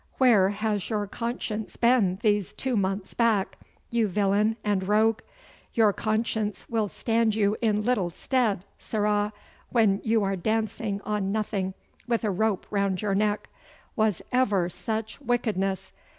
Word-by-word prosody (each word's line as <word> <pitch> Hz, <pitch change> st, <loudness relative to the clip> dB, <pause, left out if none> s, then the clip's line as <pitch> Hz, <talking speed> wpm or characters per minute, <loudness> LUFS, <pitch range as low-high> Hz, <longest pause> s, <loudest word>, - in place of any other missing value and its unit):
Where 220 Hz, -8 st, +5 dB
has 205 Hz, -1 st, -2 dB
your 210 Hz, -2 st, 0 dB
conscience 220 Hz, 0 st, -4 dB
been 235 Hz, -7 st, +3 dB
these 205 Hz, -3 st, +1 dB
two 260 Hz, -2 st, -2 dB
months 195 Hz, -1 st, -1 dB
back, 225 Hz, -5 st, +1 dB, 0.3 s
you 230 Hz, -2 st, +2 dB
villain 205 Hz, +3 st, +2 dB
and 195 Hz, -3 st, 0 dB
rogue? 220 Hz, +2 st, +3 dB, 0.6 s
Your 220 Hz, -3 st, +4 dB
conscience 215 Hz, -1 st, -1 dB
will 225 Hz, -3 st, 0 dB
stand 225 Hz, +1 st, +1 dB
you 210 Hz, -1 st, +2 dB
in 210 Hz, -2 st, +2 dB
little 210 Hz, -7 st, +1 dB
stead, 210 Hz, -1 st, 0 dB
sirrah, 210 Hz, -1 st, 0 dB, 0.4 s
when 215 Hz, -5 st, +3 dB
you 220 Hz, -1 st, +2 dB
are 195 Hz, 0 st, 0 dB
dancing 215 Hz, +1 st, -1 dB
on 205 Hz, -2 st, -1 dB
nothing 200 Hz, -3 st, -2 dB, 0.3 s
with 235 Hz, -1 st, 0 dB
a 210 Hz, -, +1 dB
rope 200 Hz, 0 st, 0 dB
round 200 Hz, -1 st, 0 dB
your 205 Hz, -2 st, +1 dB
neck. 210 Hz, +1 st, 0 dB, 0.5 s
Was 215 Hz, -6 st, +1 dB
ever 205 Hz, -9 st, +2 dB
such 220 Hz, +6 st, -4 dB
wickedness? 215 Hz, -7 st, -1 dB
210 Hz, 140 wpm, -26 LUFS, 200-225 Hz, 0.6 s, Where